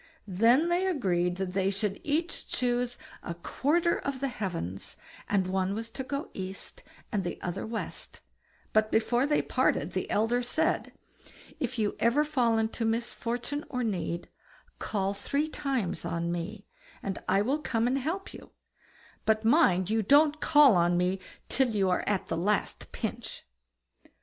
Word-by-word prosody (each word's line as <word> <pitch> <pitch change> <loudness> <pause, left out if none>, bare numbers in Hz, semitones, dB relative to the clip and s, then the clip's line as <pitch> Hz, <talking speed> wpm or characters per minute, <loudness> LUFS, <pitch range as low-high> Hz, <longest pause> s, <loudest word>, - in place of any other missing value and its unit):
Then 230 - +4
they 360 +2 +2
agreed 180 - +1
that 190 -1 -2
they 190 0 +2
should 200 0 -2
each 320 +4 -1
choose 245 0 0 0.2
a 170 - -5
quarter 320 - +1
of 280 -2 -3
the 275 +1 -1
heavens, 170 - -4 0.3
and 195 -2 +2
one 190 +1 0
was 225 +1 -5
to 265 - -5
go 280 +2 -4
east 190 0 -4 0.3
and 205 -5 0
the 175 - -4
other 180 +4 -3
west; 225 0 -5 0.5
but 215 0 +3
before 240 +4 +2
they 295 - +2
parted, - - +1
the - - -3
elder 225 +4 +2
said: 320 +7 0 0.7
"If 255 - -2
you 210 -2 0
ever 260 +6 +3
fall 245 -7 +2
into 225 +1 -1
misfortune 235 +4 -2
or 250 -1 -2
need, 175 -5 -2 0.5
call 195 -2 -1
three 280 +9 -1
times 265 - -2
on 170 0 -2
me, 185 +5 -4 0.4
and 195 -1 -3
I 195 - +4
will 275 +7 +1
come 230 -6 0
and 260 +3 +2
help 335 +9 -3
you; - - -12 0.7
but 220 0 +2
mind 210 - +4
you 220 0 +3
don't 290 +7 +4
call 295 - +6
on 175 0 +3
me 180 +2 +1 0.3
till 265 -1 +2
you 190 -2 +2
are 180 - +1
at 205 -3 0
the 165 - -2
last 205 +5 -1
pinch." - - -5
225 Hz, 160 wpm, -29 LUFS, 190-270 Hz, 0.7 s, call